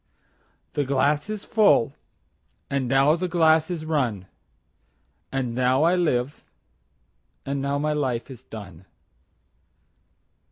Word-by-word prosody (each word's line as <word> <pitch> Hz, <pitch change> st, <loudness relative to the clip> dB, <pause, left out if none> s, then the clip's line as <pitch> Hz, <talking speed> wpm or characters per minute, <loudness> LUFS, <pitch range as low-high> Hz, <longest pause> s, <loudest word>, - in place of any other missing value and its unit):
17The 145 Hz, -2 st, -1 dB
glass 145 Hz, +5 st, +1 dB
is 215 Hz, -2 st, -5 dB
full, 200 Hz, -, +3 dB, 0.8 s
and 140 Hz, -2 st, 0 dB
now 135 Hz, +4 st, +4 dB
the 180 Hz, +2 st, -2 dB
glass 160 Hz, -2 st, +3 dB
is 165 Hz, -3 st, -4 dB
run,18And 115 Hz, -, -6 dB
now 130 Hz, +4 st, +2 dB
I 170 Hz, +2 st, +4 dB
live, 145 Hz, -6 st, 0 dB, 1.0 s
and 140 Hz, 0 st, -2 dB
now 140 Hz, +1 st, -1 dB
my 150 Hz, +1 st, 0 dB
life 130 Hz, -4 st, -2 dB
is 125 Hz, -1 st, -11 dB
done. 95 Hz, -7 st, -11 dB
140 Hz, 110 wpm, -24 LUFS, 125-155 Hz, 1.0 s, now